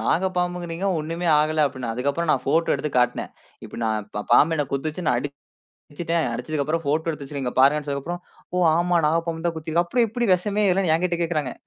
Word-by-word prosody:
நாகப் 185 Hz, +2 st, +1 dB
பாம்புங்கறீங்க 175 Hz, 0 st, -2 dB
ஒண்ணுமே 165 Hz, +3 st, -3 dB
ஆகல 155 Hz, 0 st, +2 dB
அப்படின்னு. 130 Hz, -4 st, -5 dB
அதுக்கப்புறம் 140 Hz, +7 st, -1 dB
நான் 130 Hz, -, 0 dB
ஃபோட்டோ 160 Hz, +4 st, +2 dB
எடுத்து 150 Hz, -, -3 dB
காட்டுனேன். 125 Hz, 0 st, 0 dB, 0.4 s
இப்ப -, -, -9 dB
நான் 110 Hz, -2 st, -1 dB
பா 105 Hz, -, -1 dB
பாம்பு 160 Hz, +2 st, +6 dB
என்ன 145 Hz, -, +1 dB
கொத்துச்சு, 155 Hz, +5 st, -3 dB
நான் 125 Hz, -, +2 dB, 0.5 s
அடுச்சுட்டேன். 165 Hz, +2 st, -3 dB
அடுச்சதுக்கப்புறம் 155 Hz, +2 st, -2 dB
ஃபோட்டோ 155 Hz, +3 st, 0 dB
எடுத்து 150 Hz, -3 st, -4 dB
வச்சுருக்கேன் 135 Hz, -2 st, -4 dB
இங்க 125 Hz, -, -4 dB
பாருங்கன்னு 150 Hz, +2 st, +3 dB
சொன்னதுக்கு 140 Hz, -1 st, -3 dB
அப்புறம், 175 Hz, 0 st, -8 dB, 0.3 s
ஓ! -, -, +1 dB, 0.2 s
ஆமா 175 Hz, 0 st, +2 dB
நாகப்பாம்பு 165 Hz, +1 st, -1 dB
தான் 170 Hz, -, -2 dB
கொத்தி 160 Hz, 0 st, -7 dB
இருக்கு. 170 Hz, +2 st, +2 dB
அப்புறம் 235 Hz, +6 st, +2 dB
எப்படி 240 Hz, +2 st, -1 dB
வெஷமே 205 Hz, +3 st, 0 dB
ஏறலன்னு 180 Hz, -3 st, +2 dB
எங்கிட்ட 175 Hz, 0 st, -1 dB
கேக்கறாங்க. 155 Hz, -6 st, -2 dB
160 Hz, 195 wpm, -23 LUFS, 140-175 Hz, 0.5 s, பாம்பு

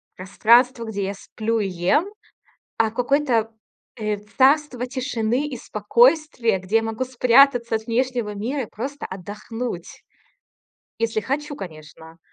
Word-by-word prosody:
пространство, 235 Hz, +6 st, +3 dB
где 205 Hz, -3 st, -3 dB
я 200 Hz, -, -3 dB
сплю 220 Hz, +3 st, -3 dB
и 200 Hz, -, 0 dB
ем, 185 Hz, -, +1 dB, 0.7 s
а 225 Hz, -1 st, +3 dB
в -, -, -21 dB
какое-то, 245 Hz, -3 st, +1 dB, 0.5 s
э, 215 Hz, -3 st, -2 dB, 0.2 s
царство 265 Hz, -2 st, +3 dB
тишины 255 Hz, +1 st, -1 dB
и 260 Hz, -, -6 dB
спокойствия, 240 Hz, -, +2 dB
где 185 Hz, +4 st, 0 dB
я 225 Hz, -, +3 dB
могу 225 Hz, +2 st, -3 dB
спрятаться 250 Hz, -1 st, +4 dB
от 220 Hz, +1 st, -2 dB
внешнего 240 Hz, -3 st, -1 dB
мира 255 Hz, +7 st, -2 dB
и -, -, -6 dB
просто 275 Hz, +6 st, -6 dB
отдохнуть, 205 Hz, +1 st, -7 dB, 1.0 s
если 230 Hz, -1 st, 0 dB
хочу, 290 Hz, +5 st, -3 dB
конечно. 160 Hz, -, -11 dB
230 Hz, 130 wpm, -22 LUFS, 210-260 Hz, 1.0 s, спрятаться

